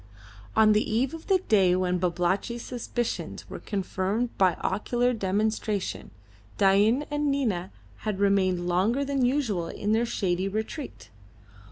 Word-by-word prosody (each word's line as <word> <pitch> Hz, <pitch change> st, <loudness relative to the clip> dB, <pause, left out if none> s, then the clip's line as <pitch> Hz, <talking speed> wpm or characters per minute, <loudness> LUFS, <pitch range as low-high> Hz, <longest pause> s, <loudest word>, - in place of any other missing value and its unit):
On 220 Hz, -1 st, +6 dB
the 210 Hz, +1 st, +1 dB
eve 250 Hz, +6 st, +1 dB
of 325 Hz, 0 st, -9 dB
the 385 Hz, -2 st, +4 dB
day 190 Hz, -4 st, +4 dB
when 180 Hz, -1 st, 0 dB
Babalatchi's 180 Hz, +7 st, -1 dB
suspicions 240 Hz, -1 st, -4 dB
were -, -, -7 dB
confirmed 200 Hz, +3 st, -2 dB
by 185 Hz, -3 st, +3 dB
ocular 240 Hz, +5 st, 0 dB
demonstration, 210 Hz, 0 st, -1 dB, 0.5 s
Dain 205 Hz, +8 st, +4 dB
and 295 Hz, 0 st, 0 dB
Nina 220 Hz, -11 st, 0 dB, 0.3 s
had 215 Hz, -3 st, -3 dB
remained 190 Hz, -3 st, +2 dB
longer 210 Hz, +10 st, +1 dB
than 275 Hz, -2 st, 0 dB
usual 245 Hz, -, 0 dB
in 205 Hz, +5 st, -3 dB
their 230 Hz, +2 st, +2 dB
shady 190 Hz, -5 st, -1 dB
retreat. 220 Hz, +8 st, -5 dB
210 Hz, 135 wpm, -27 LUFS, 185-240 Hz, 0.5 s, On